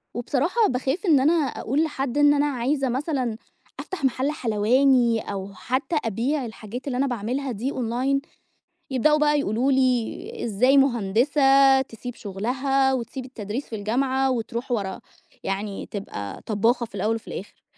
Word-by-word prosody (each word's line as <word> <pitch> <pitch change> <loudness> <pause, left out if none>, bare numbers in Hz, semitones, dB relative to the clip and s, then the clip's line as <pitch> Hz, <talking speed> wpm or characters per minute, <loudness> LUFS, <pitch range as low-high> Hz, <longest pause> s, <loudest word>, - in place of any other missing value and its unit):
وبصراحة 295 - +1
باخاف 270 +9 -1
إن 310 -7 +5
أنا 290 +5 +4
أقول 295 -2 0
لحد 275 -4 -2
إن 290 0 +6
أنا 290 0 +2
عايزة 270 +1 0
مثلًا 255 -3 -1 0.4
أفتح 380 -6 -6
مَحَل 265 +2 +1
حلواني 240 0 +3
أو 195 0 -6
حتّى 260 - -2
أبيع 245 +6 -1
الحاجات 230 +3 -8
اللي 250 -3 -1
أنا 275 +2 +2
باعملها 250 +3 -2
دي 240 +5 -3
online، 255 +3 0 0.7
يبدؤوا 300 +4 +3
بقى 295 0 +3
يقولوا 255 +1 +1
لي: 260 - 0
"إزاي 245 +5 +3
مهندسة 270 +3 +4
تسيب 245 -1 -8
شُغلها 260 +7 0
وتسيب 255 +1 -4
التدريس 235 0 -5
في 225 - -5
الجامعة 260 +5 0
وتروح 235 +1 -3
ورا 200 -5 -2 0.4
يعني 195 +1 -3
تبقى 100 - -6
طبّاخة 230 +3 +1
في 215 - -14
الأول 210 +3 0
وفي 225 - -8
الآخر." 200 - -8
255 Hz, 145 wpm, -24 LUFS, 225-275 Hz, 0.7 s, إن